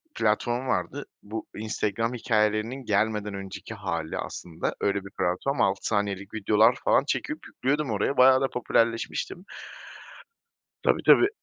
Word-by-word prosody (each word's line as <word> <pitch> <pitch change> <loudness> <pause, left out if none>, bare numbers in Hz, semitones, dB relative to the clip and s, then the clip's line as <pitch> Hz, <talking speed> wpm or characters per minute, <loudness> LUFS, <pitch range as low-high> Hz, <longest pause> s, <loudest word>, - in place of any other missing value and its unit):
platform 120 +4 0
vardı. 140 +2 -2 0.2
Bu 110 +2 -6
Instagram 110 +2 -1
hikayelerinin 115 +1 0
gelmeden 105 0 0
önceki 100 +2 -7
hâli 90 -7 -3
aslında, 85 -2 -4
öyle 100 -1 0
bir 95 - -10
platform. 90 +11 0
6 95 0 +1
saniyelik 100 -2 -1
videolar 110 +2 +4
falan, - - +4
çekip - - -3
yüklüyordum 145 +2 -1
oraya, 105 +6 0
bayağı 130 +1 +7
da 135 - +2
popülerleşmiştim. 115 +9 -1 1.4
Tabii, - - +2
tabii. 385 - +7
110 Hz, 125 wpm, -26 LUFS, 100-125 Hz, 1.4 s, bayağı